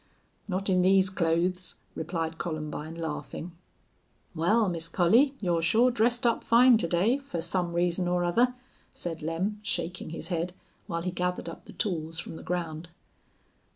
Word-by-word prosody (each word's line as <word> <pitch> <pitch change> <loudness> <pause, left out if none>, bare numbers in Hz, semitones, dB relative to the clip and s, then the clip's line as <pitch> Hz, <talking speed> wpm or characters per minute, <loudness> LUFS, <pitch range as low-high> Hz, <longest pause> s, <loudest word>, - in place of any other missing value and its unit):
"Not 195 0 -2
in 185 -2 +3
these 190 0 +4
clothes," 180 0 0 0.2
replied 165 0 -3
Columbine, 155 -1 -4
laughing. 165 +1 -5 0.8
"Wal, 205 +7 +3
Miss 165 -2 -1
Collie, 230 - +4
you're 175 -4 +1
shore 225 +10 +4
dressed 235 +1 +2
up 235 - +2
fine 235 0 +6
to 170 - +1
day, 195 +11 +2
fer 275 -11 -5
some 175 +1 -1
reason 175 +1 +1
or 175 0 +1
other," 240 +9 +2 0.4
said 165 -2 -5
Lem, 175 +7 -2
shaking 175 -4 -3
his 165 - -6
head, 175 0 -1 0.3
while 170 -1 -3
he 180 - -1
gathered 180 0 -2
up 165 - -8
the - - -12
tools 165 -6 -2
from 160 - -5
the - - -8
ground. 170 -2 -4
175 Hz, 155 wpm, -28 LUFS, 165-195 Hz, 0.8 s, fine